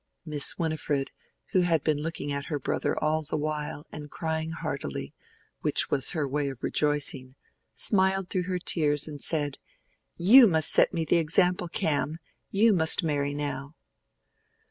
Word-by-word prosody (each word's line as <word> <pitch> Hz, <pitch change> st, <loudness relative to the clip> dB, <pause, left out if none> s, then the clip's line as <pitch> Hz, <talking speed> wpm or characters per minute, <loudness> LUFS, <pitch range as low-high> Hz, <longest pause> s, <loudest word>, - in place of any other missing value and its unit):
Miss 150 Hz, -3 st, -2 dB
Winifred, 150 Hz, -4 st, -2 dB, 0.4 s
who 185 Hz, -, +3 dB
had 165 Hz, -4 st, +2 dB
been 150 Hz, -2 st, 0 dB
looking 155 Hz, -2 st, -4 dB
at 140 Hz, 0 st, -3 dB
her 150 Hz, -, -3 dB
brother 135 Hz, -, -2 dB
all 155 Hz, +1 st, 0 dB
the 155 Hz, 0 st, -4 dB
while 150 Hz, -1 st, -4 dB
and 150 Hz, -1 st, -8 dB
crying 160 Hz, 0 st, -3 dB
heartily, 155 Hz, -, -5 dB, 0.5 s
which -, -, +1 dB
was 135 Hz, -1 st, +2 dB
her 155 Hz, -4 st, -1 dB
way 140 Hz, +1 st, -1 dB
of 135 Hz, -2 st, -10 dB
rejoicing, 145 Hz, -3 st, 0 dB, 0.4 s
smiled 190 Hz, -2 st, +2 dB
through 180 Hz, -1 st, -1 dB
her 180 Hz, -, -1 dB
tears 150 Hz, -4 st, 0 dB
and 145 Hz, -2 st, -8 dB
said, 145 Hz, -4 st, -1 dB, 0.6 s
"You 230 Hz, +8 st, +8 dB
must 160 Hz, -4 st, +3 dB
set -, -, +4 dB
me 165 Hz, -1 st, -2 dB
the 170 Hz, -, +3 dB
example, 180 Hz, +2 st, +1 dB
Cam: 155 Hz, -1 st, 0 dB, 0.3 s
you 215 Hz, +2 st, +3 dB
must 165 Hz, +1 st, +5 dB
marry 145 Hz, -2 st, -1 dB
now." 140 Hz, 0 st, -4 dB
155 Hz, 155 wpm, -27 LUFS, 145-170 Hz, 0.6 s, You